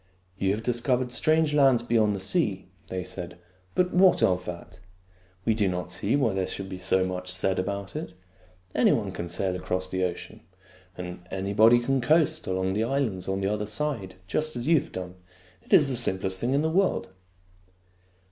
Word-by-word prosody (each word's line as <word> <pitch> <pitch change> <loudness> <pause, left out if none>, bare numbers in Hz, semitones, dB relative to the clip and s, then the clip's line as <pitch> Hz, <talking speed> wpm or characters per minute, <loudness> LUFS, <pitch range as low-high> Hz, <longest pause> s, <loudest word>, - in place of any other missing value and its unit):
" 90 +1 -38
You 95 - +1
have 110 - -7
discovered 125 +1 0
strange 155 +4 +2
lands 135 -5 +4
beyond 110 -3 +2
the - - -4
sea," 95 - -1 0.2
they 95 0 -4
said. 90 0 -7 0.2
" 90 0 -35
But 180 0 +1
what 185 0 +5
of 90 -1 +2
that? 90 +1 -8 0.7
We 115 - +3
do 105 -2 +1
not 90 0 -3
see 100 +7 -1
why 125 -8 +2
there 95 -1 -1
should 95 -1 -5
be 95 -1 -6
so 95 0 +2
much 90 0 -4
said 95 0 0
about 100 +3 -4
it. 155 +2 -6 0.6
Any - - +4
body - - -1
can 85 - -5
sail 90 +2 0
across 90 0 -2
the 95 0 -1
ocean; 90 -1 -4 0.6
and 90 0 -6
anybody 100 +5 +4
can 135 +2 0
coast 155 +3 +2
along 95 0 0
the 110 +3 0
islands 115 -7 -1
on 95 0 -1
the 95 - 0
other 105 0 -3
side, 105 -5 -3
just 155 +11 -1
as 120 - -3
you 165 -1 +5
have - - -10
done. 90 0 -7 0.4
It - - -22
is 145 - +6
the 135 - -1
simplest 95 -5 -1
thing 125 +3 +1
in 145 - +2
the 160 - +1
world." 190 +3 +1
100 Hz, 195 wpm, -26 LUFS, 95-130 Hz, 0.7 s, is